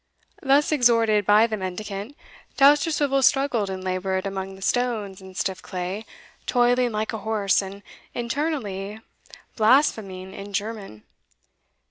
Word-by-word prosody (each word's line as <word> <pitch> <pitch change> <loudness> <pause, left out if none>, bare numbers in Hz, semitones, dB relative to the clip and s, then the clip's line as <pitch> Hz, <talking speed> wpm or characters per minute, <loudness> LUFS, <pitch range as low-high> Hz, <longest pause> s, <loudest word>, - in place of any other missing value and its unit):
Thus 280 +2 +3
exhorted 230 -7 +3
by 210 +2 +6
the 220 -2 -3
mendicant, 200 +6 -6 0.4
Dousterswivel 290 -1 +4
struggled 260 -6 +2
and 190 -1 -5
laboured 185 +1 -2
among 195 -1 -4
the 190 - -10
stones 215 -5 -1
and 190 0 -12
stiff 190 -1 -2
clay, 185 +4 -5 0.4
toiling 245 0 +3
like 215 +1 -2
a 220 - -3
horse, 210 -3 +1
and 200 +1 -9 0.3
internally 235 -6 -3 0.6
blaspheming 215 -6 +2
in 200 +1 -9
German. 200 - -5
215 Hz, 120 wpm, -24 LUFS, 195-245 Hz, 0.6 s, by